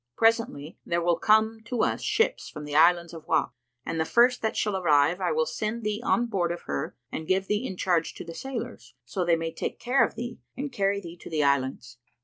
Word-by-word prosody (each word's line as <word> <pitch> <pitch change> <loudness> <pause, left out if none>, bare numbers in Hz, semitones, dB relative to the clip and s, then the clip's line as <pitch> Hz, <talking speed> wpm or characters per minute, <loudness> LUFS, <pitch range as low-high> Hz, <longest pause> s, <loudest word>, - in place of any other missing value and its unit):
Presently 225 - +1
there 170 0 0
will 170 -1 +2
come 220 +1 +3
to 235 -1 0
us - - 0
ships 450 +4 0
from 150 -1 -8
the 145 0 -5
Islands 170 +2 +4
of 160 -2 -10
Wak - - +2 0.3
and 165 - -3
the - - +3
first 245 +7 +4
that 220 - -1
shall 210 -2 0
arrive 165 0 +3
I 180 - +1
will 160 0 +2
send 220 +5 -3
thee 210 +1 -2
on 240 -2 +2
board 190 -7 -1
of 175 - -5
her 70 -1 -4 0.2
and 160 - -5
give 190 +1 +2
thee 210 +3 0
in 185 - -6
charge 175 -3 0
to - - -8
the 165 - -7
sailors, 245 +3 -6
so 190 - -2
they 170 -1 +3
may 165 0 -3
take - - -4
care 245 0 +3
of - - -1
thee 240 0 -6 0.2
and 280 +1 -4
carry 200 -3 0
thee 170 -1 -9
to - - -11
the 155 -2 +1
Islands. 130 -3 0
185 Hz, 230 wpm, -27 LUFS, 165-225 Hz, 0.3 s, Islands